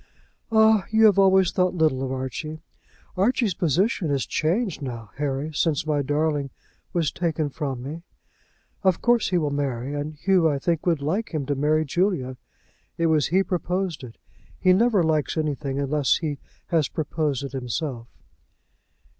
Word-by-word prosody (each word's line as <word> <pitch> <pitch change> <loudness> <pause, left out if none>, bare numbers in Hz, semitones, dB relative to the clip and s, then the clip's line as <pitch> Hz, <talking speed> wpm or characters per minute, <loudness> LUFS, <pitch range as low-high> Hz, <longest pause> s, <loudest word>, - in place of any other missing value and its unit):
"Ah, 220 -2 +4
you 220 0 +4
have 200 -2 +5
always 190 -2 +5
thought 180 0 +1
little 155 -6 +2
of 130 -1 -2
Archie. 140 +4 -5 0.5
Archie's 210 +1 +2
position 175 - +1
is 140 -2 0
changed 180 +3 -1
now, 115 -5 -6
Harry, 145 +2 -2
since 155 -1 0
my 150 -2 +1
darling 145 0 0 0.4
was 165 -4 0
taken 160 -4 -1
from 135 -5 -4
me. 155 +5 -6 0.8
Of 190 -3 +2
course 240 -2 +2
he 180 - +2
will 150 -4 0
marry, 140 -2 -2
and 145 +1 -4
Hugh, 180 +1 +3
I 145 - 0
think, 165 +4 -1
would 165 -5 +1
like 180 +5 -2
him 145 -3 -1
to 145 - 0
marry 150 +3 +1
Julia. 170 -6 -1 0.6
It 165 - +1
was 150 -3 +2
he 190 +3 +2
proposed 180 -3 -2
it. 115 -3 -10 0.4
He 185 -1 +5
never 210 -1 +3
likes 155 -2 0
anything 145 -3 -2
unless 140 0 +1
he 150 -5 -4 0.3
has 160 -5 +2
proposed 150 -3 -2
it 140 - -5
himself." 125 -1 -4
155 Hz, 160 wpm, -24 LUFS, 140-180 Hz, 0.8 s, have